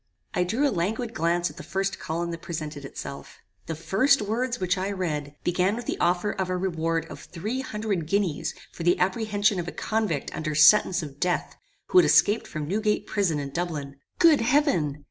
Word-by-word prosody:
"I 180 - +1
threw 240 +11 +1
a - - 0
languid 220 +7 -2
glance 170 0 0
at - - -18
the - - -7
first 195 0 -2
column 170 +2 -3
that 165 0 -6
presented 155 -5 -5
itself. 140 0 -8 0.3
The 160 - -3
first 195 - +3
words 235 +4 -1
which 185 0 +1
I 190 +1 -2
read, 150 -7 -3
began 180 +3 +1
with 240 0 -6
the - - -3
offer 180 +4 +1
of 190 -2 -3
a 185 - 0
reward 165 -3 -1
of - - -10
three 210 +9 -5
hundred 210 -9 -3
guineas 190 -5 0 0.2
for - - -10
the 175 +1 +3
apprehension 205 +1 +1
of 175 - -4
a - - -3
convict 215 -10 -2
under 155 -1 -3
sentence 170 +3 +6
of 145 -2 -9
death, 180 -1 -1 0.3
who 370 - +7
had - - +5
escaped 210 +3 +4
from 150 -1 -5
Newgate 210 +3 0
prison 190 -8 0
in 140 -1 -5
Dublin. 145 -4 -4 0.2
Good 320 -7 +6
heaven! 230 - +2
180 Hz, 195 wpm, -26 LUFS, 160-210 Hz, 0.3 s, who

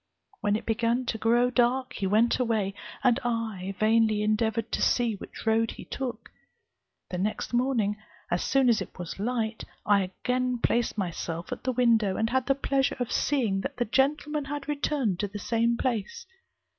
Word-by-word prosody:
When 205 -1 +1
it 215 - -3
began 230 +2 +1
to 225 -2 -2
grow 240 +3 +3
dark 255 +1 +2
he 195 - -2
went 220 +6 +3
away, 220 -5 0 0.3
and 250 -1 +4
I 220 -5 -2
vainly 220 -1 +3
endeavoured 220 +1 0
to - - -1
see 240 -2 +2
which 200 - -9
road 225 0 +3
he - - -8
took. 240 -4 -5 0.8
The 180 - -2
next 210 +5 -2
morning, 240 -5 +1 0.3
as 175 - +1
soon 270 -1 +3
as 235 -3 +4
it - - -8
was 175 +1 -6
light, 225 0 -2 0.2
I 205 -1 +4
again 250 +7 -1
placed 235 -1 0
myself 170 -3 -4
at - - -5
the 260 - +2
window, 230 -5 +3
and 225 +1 0
had 260 0 +1
the 275 - +3
pleasure 275 0 0
of 245 - -2
seeing 225 -9 +1
that 275 +4 -5
the 240 - +1
gentleman 290 +4 +1
had 290 0 -5
returned 285 - 0
to 205 - 0
the 205 +1 -7
same 230 +2 +1
place. 255 - -2
230 Hz, 180 wpm, -27 LUFS, 210-255 Hz, 0.8 s, and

